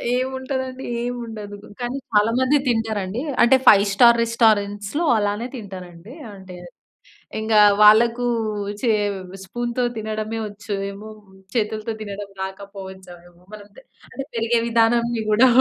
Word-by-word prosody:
ఏముంటదండి 260 0 -3 0.2
ఏమి 245 +1 -3
ఉండదు. 210 -2 -8 0.2
కానీ 245 +2 -3 0.2
చాలా 210 +2 +4
మంది 260 +3 +3
తింటారండి. 220 -2 -1 0.2
అంటే 245 +3 +6
5 200 -1 +8
స్టార్ 235 +3 +6
రెస్టారెంట్స్‌లో 215 +4 +1
అలానే 205 +3 -1
తింటారండి. 190 -2 -10 0.2
అంటే 190 -2 -11 0.8
ఇంకా 220 -1 +3 0.2
వాళ్ళకు 230 +3 +5 0.6
చే 245 - +1 0.5
స్పూన్‌తో 240 +5 -3
తినడమే 215 +1 -4
వచ్చు 210 +1 -7 0.2
ఏమో, 205 +2 -10 0.5
చేతులతో 220 0 -1
తినడం 205 -1 -7
రాకపోవచ్చు 190 -1 -9 0.2
ఏమో, 175 0 -25
మనము 205 -1 -11
తె - - -12 0.3
అంటే 270 +1 -6
పెరిగే 230 +1 +1
విధానాన్ని 235 0 +2
కూడా. 230 +5 +6
220 Hz, 120 wpm, -21 LUFS, 205-240 Hz, 0.8 s, 5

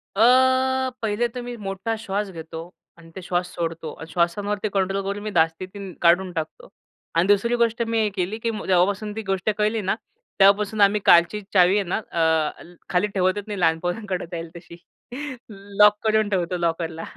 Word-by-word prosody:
अ, 210 - +1 0.8
पहिले 220 +2 0
तर 245 +1 -7
मी 245 0 -6
मोठा 195 +4 -3
श्वास 200 -1 -2
घेतो 160 -1 -8 0.4
आणि 165 -1 -16
ते 190 - -7
श्वास 175 0 -1
सोडतो. 165 -2 -4
अन 160 - -10
श्वासांवरती 200 +5 -1
कंट्रोल 195 0 0
करून 200 +1 -4
मी 215 - -3
धास्ती 165 +3 +2
ती 195 0 -9
काढून 180 +2 +4
टाकतो 185 - -6 0.5
आणि 170 +3 +3
दुसरी 205 +4 +3
गोष्ट 235 0 +1
मी 230 - 0
हे 210 - +1
केली, 190 +3 -2
की 230 0 -2 0.2
जेव्हापासून 195 +3 +2
ती 220 - -3
गोष्ट 195 +2 0
कळली 215 +1 +1
ना, 190 - 0 0.4
तेव्हापासून 200 +2 +4
आम्ही 200 +1 +4
कालची 170 +5 +5
चावी 185 0 +5
आहे 205 - +1
ना - - 0
अ, 160 -2 +1 0.3
खाली 180 +3 +1
ठेवतच 195 0 0
नाही 205 -3 -5
लहान 165 -2 +2
पोरांकडं 185 +2 -3
जाईल 165 -1 -5
तशी. 170 0 -11 0.8
लॉक 205 +1 +3
करून 215 -1 +2
ठेवतो 180 -2 -1
लॉकरला. 165 -1 -2
195 Hz, 175 wpm, -23 LUFS, 175-210 Hz, 0.8 s, कालची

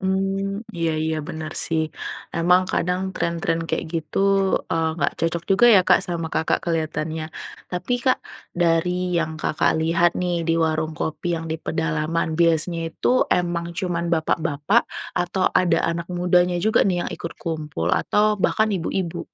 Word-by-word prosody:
mmm, 195 +2 -1
iya 165 -1 0
iya 160 0 -1
bener 160 0 -5
sih. 160 -1 +1 0.5
Emang 180 +2 +4
kadang 180 +1 0
tren-tren 170 0 -1
kayak - - -1
gitu, 160 -3 -3 0.5
eee, 165 0 +1
nggak 145 - 0
cocok 165 0 0
juga 200 +5 +6
ya 195 - +8
Kak 180 - +6
sama 170 -2 -3
Kakak 160 - +1
kelihatannya. 160 -1 -2 0.4
Tapi 180 +6 -3
Kak, 255 - +3 0.4
dari 180 +1 +1
yang 160 -1 -2
Kakak 155 0 +1
lihat 170 +2 +3
nih 180 -1 -1
di 165 - +3
warung 155 -1 0
kopi 170 +3 -2
yang 165 0 -5
di 160 - -2
pedalaman, 160 0 -1
biasanya 170 0 +2
itu - - -2 0.2
emang 175 -1 0
cuman 175 -2 -1
bapak-bapak, 160 +5 +1 0.3
atau 175 +1 -1
ada 170 -3 +3
anak 170 0 -5
mudanya 180 0 +2
juga 220 - +4
nih 180 - +1
yang - - -4
ikut 170 - -6
kumpul 155 - -4
atau 210 -1 +2
bahkan 220 +3 +2
ibu-ibu? 175 -1 -2
170 Hz, 150 wpm, -23 LUFS, 160-180 Hz, 0.5 s, ya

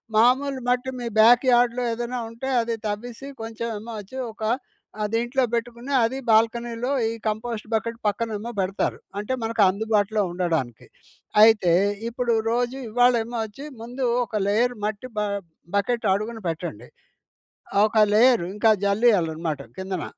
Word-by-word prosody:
మామూలు 260 +4 +3
మట్టి 250 +1 +1
మీ 240 - -4
బ్యాక్ 240 +4 +7
యార్డ్‌లో 245 0 +3
ఏదేనా 240 +2 -3
ఉంటే, 235 +4 -6
అది 230 0 -2
తవ్వీసి, 235 +5 -5
కొంచెం 225 +1 -5
ఏమో 230 +2 -8
వచ్చి 230 +7 -11 0.2
ఒక 220 - -21 0.6
ఆహ్, 210 - +1
దీంట్లో 240 +3 +1
పెట్టుకుని, 235 +3 -3
అది 250 +4 0
బాల్కనీలో 230 +2 +2 0.2
ఈ - - -2 0.2
కంపోస్ట్ 220 0 -3
బకెట్ 230 +1 -1
పక్కనేమో 220 +1 -2
బెడతారు. 190 +1 -1 0.2
అంటే, 210 +5 -3
మనకందుబాటులో 215 -1 +2
ఉండడానికి. 160 -10 -2 0.6
అయితే, 215 -6 +6 0.4
ఇప్పుడు 240 0 -1 0.2
రోజూ 245 +2 0
ఇవ్వాళేమో 240 0 +2
వచ్చి, 270 +7 -10 0.2
ముందు 250 +3 -4 0.2
ఒక 220 - -4
లేయర్ 240 +5 +2
మట్టి 215 +4 -3
బ - - +2 0.6
బకెట్ 235 +3 0
అడుగున 220 +3 -3
పెట్టండి. 165 -8 -5 0.9
ఆహ్, 200 - +4
ఒక 220 - -3 0.2
లేయరు 235 -4 +5
ఇంకా 220 +1 +4
జల్లీయాలనమాట 170 - +1 0.2
కిందన. 190 -1 -4
230 Hz, 135 wpm, -24 LUFS, 210-245 Hz, 0.9 s, బ్యాక్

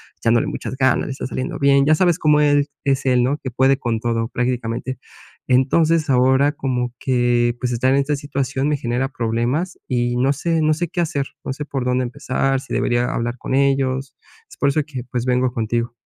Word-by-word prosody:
echándole 115 0 +2
muchas 130 - -5
ganas, 130 -2 +2
le - - -4
está 130 - -5
saliendo 130 -1 -4
bien, 140 0 +4
ya 155 +1 +5
sabes 175 -1 +2
cómo 150 -1 +4
el: 145 -1 +3 0.2
"Es 135 -1 +1
él, 125 -2 +3
¿no? 140 +4 0
que 130 - -3
puede 130 +2 +3
con 115 -4 -2
todo 115 0 -1
prácticamente". 125 +1 -2 0.5
Entonces, 155 +5 +2
ahora 130 +3 +4
como 125 -4 -2
que, 120 -2 +1
pues, 125 -1 -2
estar 130 +3 +1
en 140 - +3
esta 145 +1 0
situación 140 0 -2
me 150 - +1
genera 125 +2 -2
problemas 120 +8 -2
y 120 -1 0
no 130 +3 +2
sé, 165 +3 0
no 155 0 +3
sé 170 +2 -2
qué 175 +1 -2
hacer 150 -5 -1 0.2
no 130 - -4
sé 150 +2 -5
por 135 -3 -3
dónde 125 0 +1
empezar 130 +2 -1
sí - - -8
debería 120 0 0
hablar 120 +1 -2
con - - -5
ellos. 135 -1 +1 0.3
Es - - -14
por 140 - +2
eso 155 +2 +1
que, 130 -5 -6
pues, 125 -1 -2
vengo 125 0 +1
contigo. 115 +1 -2
130 Hz, 205 wpm, -20 LUFS, 120-140 Hz, 0.5 s, ya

